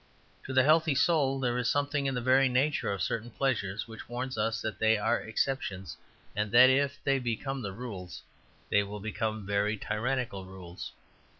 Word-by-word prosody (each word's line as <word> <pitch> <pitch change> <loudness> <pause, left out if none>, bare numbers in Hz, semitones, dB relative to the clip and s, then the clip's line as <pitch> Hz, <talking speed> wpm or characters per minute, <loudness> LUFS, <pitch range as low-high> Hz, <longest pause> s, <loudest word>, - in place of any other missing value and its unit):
To - - -5
the 130 0 +5
healthy 155 +1 +4
soul 140 -3 +2
there 125 -2 0
is 125 -1 0
something 145 0 0
in 135 - -1
the 125 - -1
very 130 +2 +4
nature 135 -1 +1
of 100 -2 -2
certain 115 +1 -2
pleasures 110 -5 -1
which 110 0 -10
warns 125 +2 -3
us 110 0 0
that 110 -3 -4
they 110 0 +4
are 105 +2 +1
exceptions, 110 -5 -2 0.4
and 105 0 -1
that 125 +2 +8
if 140 +1 +1
they 135 -1 +2
become 130 +3 -3
rules 100 -3 -7 0.5
they 105 - +5
will 100 +1 -6
become 110 0 -3
very 100 +2 0
tyrannical 110 -2 -2
rules. 95 -2 -9
120 Hz, 175 wpm, -30 LUFS, 105-135 Hz, 0.5 s, that